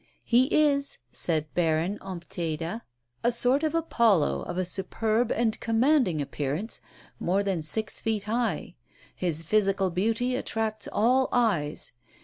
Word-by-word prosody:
"He 245 +2 +4
is," 285 -1 +2
said 155 -3 -1
Baron 170 +3 +1
Ompteda, 170 +1 -4 0.4
"a 240 - +3
sort 250 +4 +2
of 315 0 0
Apollo, 220 - +2
of - - -4
a 185 - 0
superb 215 +5 0
and 225 -2 0
commanding 230 - +2
appearance, 150 +10 -3 0.4
more 190 +3 +1
than 190 -4 -1
six 210 +8 -1
feet 220 -2 -1
high; 230 +3 -1 0.4
his 165 -3 -2
physical 195 0 +2
beauty 225 +7 0
attracts 220 -4 -2
all 255 +5 +3
eyes. 195 -12 0
215 Hz, 130 wpm, -27 LUFS, 170-240 Hz, 0.4 s, He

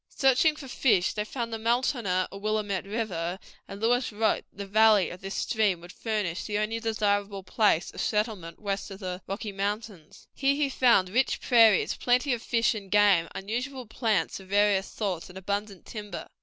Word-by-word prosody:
Searching 270 +4 +3
for 295 -3 -9
fish, 215 -8 +2
they 210 - -2
found 230 +1 -5
the 225 - -3
Multonah 230 -5 0
or 195 - -8
Willamette 205 -2 -2
River, 190 -5 -3 0.3
and 195 - -8
Lewis 245 +3 +1
wrote 220 0 0
that - - -30
the 200 - -5
valley 210 -1 +4
of 180 - -10
this 195 +1 -5
stream 210 -6 +1
would 175 +1 -12
furnish 210 -7 -2
the 205 -1 -2
only 215 +2 -1
desirable 205 -3 -1
place 195 -4 +1
of - - -6
settlement 210 -6 -2
west 200 -2 -3
of 195 - -8
the 185 -2 -5
Rocky 205 +2 -4
Mountains. 200 -3 -5
Here 275 0 +1
he 290 -1 +1
found 235 -8 +3
rich 250 +7 +1
prairies, 225 -5 +4
plenty 250 +2 +2
of 235 - -3
fish 235 0 +1
and 200 -3 -8
game, 200 -4 +4
unusual 245 +7 -4
plants 215 -7 -1
of 190 - -13
various 200 -1 +3
sorts, 190 -6 -4
and 180 - -11
abundant 200 0 -4
timber. 210 -2 -7
210 Hz, 185 wpm, -27 LUFS, 195-230 Hz, 0.3 s, valley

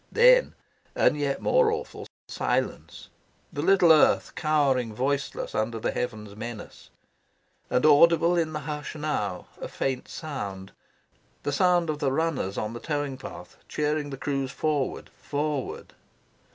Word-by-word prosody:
Then, - - +5 0.4
and - - +3
yet 145 -2 -2
more 485 -3 +4
awful, 455 +2 -5 0.2
silence; - - -3 0.4
the - - -2
little 185 -4 +5
earth 155 - +3
cowering 135 -8 +1
voiceless 140 +3 -2
under 110 +2 -1
the - - -1
heavens' 110 -4 -4
menace. 115 0 -8 0.8
And, 125 - +2
audible 170 +3 +6
in 165 -2 0
the 150 - -3
hush 150 +1 -5
now, 125 - -2 0.2
a - - -4
faint 130 -2 -3
sound; 100 - -6 0.7
the 145 - -1
sound 175 +3 +3
of 150 - -5
the 135 -2 +1
runners 140 -10 -1
on 105 +1 -3
the 120 - -6
towing 145 -2 -2
path - - -10
cheering 150 -1 -1
the 135 - -6
crews 135 -1 -2
forward, 145 -1 -2
forward. 145 -1 -3
145 Hz, 140 wpm, -26 LUFS, 125-155 Hz, 0.8 s, audible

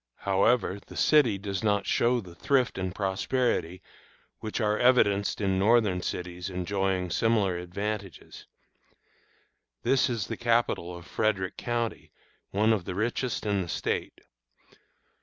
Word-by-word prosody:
However, 100 +1 +2
the - - -12
city 135 -10 +4
does 100 +1 -4
not 100 -2 +1
show 120 +1 +2
the 90 -4 -12
thrift 125 +6 +1
and 95 0 -3
prosperity 95 -2 -1 0.6
which 110 +1 -4
are 105 -1 +1
evidenced 100 -5 +3
in 95 -2 +1
Northern 105 -3 +3
cities 90 +1 -4
enjoying 95 0 -1
similar 100 -4 +1
advantages. 100 +1 -6 1.4
This 135 -1 +3
is 115 -5 -2
the - - -5
capital 115 -7 0
of 85 - -12
Frederick 95 -3 -1
County, 120 -1 -3 0.4
one 110 +3 +3
of 100 -5 -2
the 90 - -4
richest 115 +4 -2
in 100 -2 +1
the 85 - -5
State. - - -3
100 Hz, 130 wpm, -28 LUFS, 95-115 Hz, 1.4 s, city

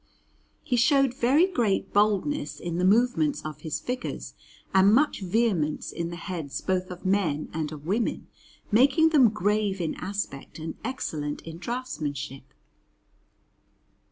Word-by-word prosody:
He 250 - 0
showed 275 +1 +4
very 265 +7 +4
great 235 - 0
boldness 210 +8 +1
in 170 0 -3
the - - +1
movements 245 +9 +3
of 150 -1 -6
his 155 -1 -3
figures 250 +1 -5 0.4
and 190 +1 +6
much 295 -5 +2
vehemence 185 -6 0
in 170 0 -3
the 170 - -6
heads 170 -5 -5
both 185 -1 -1
of 180 0 -9
men 180 -6 +1
and 155 -1 -2
of 150 -1 -9
women, 210 +7 -1 0.5
making 280 +9 +5
them 275 -7 +6
grave 205 -1 0
in 165 -3 -1
aspect 195 -8 -5
and 160 0 -5
excellent 155 - -3
in 165 0 -8
draughtsmanship. 145 - -4
195 Hz, 135 wpm, -26 LUFS, 160-245 Hz, 0.5 s, and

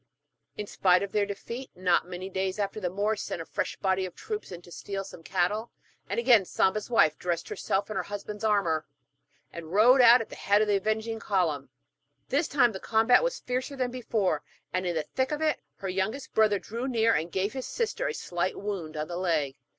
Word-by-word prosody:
In 210 - -3
spite 180 -2 +3
of 200 - -4
their 205 -1 +1
defeat, 235 +6 -6
not 180 -2 +2
many 180 +1 -6
days 190 0 -2
after 205 +1 -2
the 180 -4 -1
Moors 205 +3 -1
sent - - -4
a 165 - -5
fresh - - -3
body 190 -1 0
of 185 -2 -6
troops 430 -1 -5
to 175 -1 -10
steal 195 +2 -5
some 190 -3 -11
cattle, 195 +6 0 0.4
and - - 0
again 235 -4 +6
Samba's 195 +4 0
wife 155 -10 +4
dressed 175 -2 -2
herself 195 +1 -1
in 215 - -6
her - - +1
husband's 205 +1 -7
armour, 195 -8 +1 0.7
and 165 -1 -8
rode 240 +7 +6
out 240 +1 +9
at 225 - -5
the - - -9
head 205 +1 +3
of 215 - +2
the 205 -1 +3
avenging 220 +2 -1
column. 160 - 0 0.6
This 290 +4 +2
time 245 -5 +4
the 190 - -6
combat 225 - +4
was - - -1
fiercer 255 +3 -3
than 255 -2 -1
before, 215 -10 0 0.3
and 185 0 0
in 175 - -1
the 160 - 0
thick 260 - -2
of 300 - -1
it 310 -1 +1
her 195 - -6
youngest 195 +9 -2
brother 215 -2 +4
drew 230 +6 -5
near, 230 -3 +3
and 165 +2 -1
gave 195 +4 -1
his 260 -1 -4
sister 475 +1 -1
a - - -1
slight 175 +1 -2
wound 185 -7 -4
on 150 0 -2
the 175 - -5
leg. 160 -7 0
200 Hz, 210 wpm, -28 LUFS, 180-230 Hz, 0.7 s, out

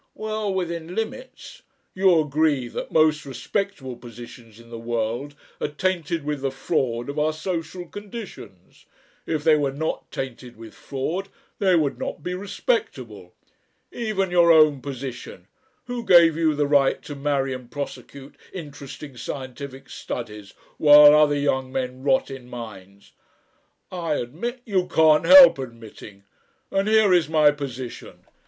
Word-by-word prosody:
"Well 215 -1 -3
within 170 -2 -4
limits." 260 - -6 0.3
"You 185 -3 +4
agree 150 -3 0
that - - -6
most 155 -1 +3
respectable 140 - -4
positions 115 -1 -13
in 115 0 -17
the 115 - -7
world 120 +4 -3 0.3
are - - 0
tainted 170 0 -2
with 150 -2 -3
the 135 - 0
fraud 125 -2 -2
of 140 +2 -4
our 155 +1 +2
social 175 +2 -5
conditions. 205 - -11 0.4
If 155 -2 -2
they 155 -1 +5
were 145 -2 0
not 160 +4 -4
tainted 125 -2 -7
with 110 -2 -12
fraud 170 +9 -4 0.3
they 190 -3 +3
would 150 -4 0
not - - -5
be 180 - -3
respectable. 405 - -3 0.6
Even 210 -6 -2
your 170 -1 +5
own 155 -4 +5
position 130 -9 -7 0.4
Who 245 -1 -5
gave 170 -6 +6
you 160 -2 +1
the 145 0 +1
right 140 -1 +3
to 145 - -7
marry 140 -1 -1
and 125 -2 -9
prosecute 140 +1 -8 0.2
interesting 145 -4 -9
scientific 135 +1 -7
studies 105 -4 -7 0.2
while 150 -1 +9
other 150 -1 +4
young 130 -2 -1
men 130 -1 -4
rot 135 0 +1
in 130 -2 -10
mines?" 100 -5 -10 0.8
"I 170 -4 -2
admit 185 - -5
" - - -46
"You 190 -5 0
can't 160 -3 +4
help 275 - +9
admitting. 115 -5 -10 0.5
And 195 +1 0
here 215 -3 +4
is 175 -4 +3
my 155 -2 +5
position. 130 -4 -8
145 Hz, 145 wpm, -23 LUFS, 130-175 Hz, 0.8 s, while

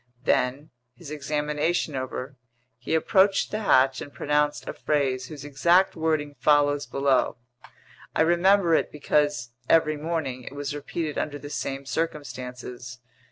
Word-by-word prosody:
Then, 135 +6 0 0.2
his 150 +3 -11
examination 150 +2 -1
over, 130 +1 -5 0.4
he 125 - -1
approached 190 +4 +3
the 215 - -2
hatch 135 -10 +3
and 145 - -8
pronounced 150 0 0
a - - -3
phrase 130 -4 -1
whose 145 -1 -9
exact 170 +7 +3
wording 155 -3 -1
follows 145 +1 +3
below. 135 -3 +1 0.8
I - - +4
remember 175 +1 +4
it - - +2
because, 145 -4 0 0.2
every 155 -2 +4
morning, 150 -5 -3
it 130 - -9
was 145 0 -4
repeated 150 +1 -4
under 145 -1 -3
the 145 0 -9
same 135 -2 -4
circumstances. 125 -4 -5
145 Hz, 135 wpm, -26 LUFS, 135-160 Hz, 0.8 s, I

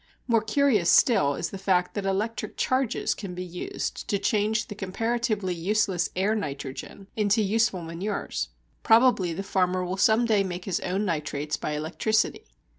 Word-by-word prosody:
More 230 -3 +3
curious 220 -4 +2
still 190 - +4
is - - -3
the 195 - -6
fact 185 -2 +1
that 200 -2 -3
electric 210 +4 -2
charges 260 -2 0
can 190 -4 -7
be 180 - -4
used 180 0 -5
to 200 - +1
change 215 +1 +1
the - - -6
comparatively 210 0 -1
useless 180 -1 0
air 195 +4 +1
nitrogen 145 -1 -5
into 215 +1 +2
useful 205 -3 +1
manures. 170 - -3 0.3
Probably 225 -6 +4
the 180 +4 -4
farmer 185 -1 0
will 185 +2 -3
some 220 +4 +4
day 215 -3 +3
make 180 -1 -5
his 190 -4 -1
own 190 +3 -1
nitrates 150 -3 -2
by 150 - -4
electricity. 165 +8 0
195 Hz, 160 wpm, -26 LUFS, 180-220 Hz, 0.3 s, still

